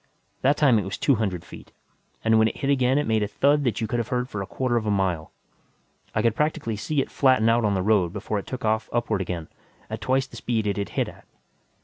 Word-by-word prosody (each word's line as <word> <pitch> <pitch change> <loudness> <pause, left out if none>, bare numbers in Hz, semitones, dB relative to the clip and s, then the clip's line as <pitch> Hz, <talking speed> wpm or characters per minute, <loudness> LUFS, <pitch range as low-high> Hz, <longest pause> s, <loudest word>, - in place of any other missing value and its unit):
That 140 +3 +3
time 130 -7 +5
it - - -2
was 95 - -4
two 140 - +3
hundred 95 -6 -2
feet, - - -12 0.5
and 110 0 +4
when 110 - +5
it - - -4
hit 140 - 0
again, 130 -1 +3
it 145 - +1
made 110 -1 +1
a 105 - 0
thud 145 +6 +2
that 120 -5 0
you - - +1
could 120 +2 -1
have 115 - -2
heard 125 0 -1
for 105 - -4
a 95 - -5
quarter 125 +3 -1
of 110 -2 0
a - - +2
mile. 95 -5 0 0.8
I 110 - +1
could 115 -2 +3
practically 150 -6 -1
see 140 +7 -1
it - - -5
flatten 130 -5 +3
out 115 +1 +3
on 105 -2 +2
the 95 - 0
road 100 -5 +3
before 105 +1 -3
it - - -9
took 130 -3 -5
off 110 +1 0
upward 115 -4 0
again, 85 -3 -4 0.4
at - - -4
twice 130 +1 +1
the - - -12
speed 115 -3 -1
it 100 -1 -1
had 100 - -2
hit - - -1
at. - - -13
110 Hz, 260 wpm, -25 LUFS, 100-130 Hz, 0.8 s, time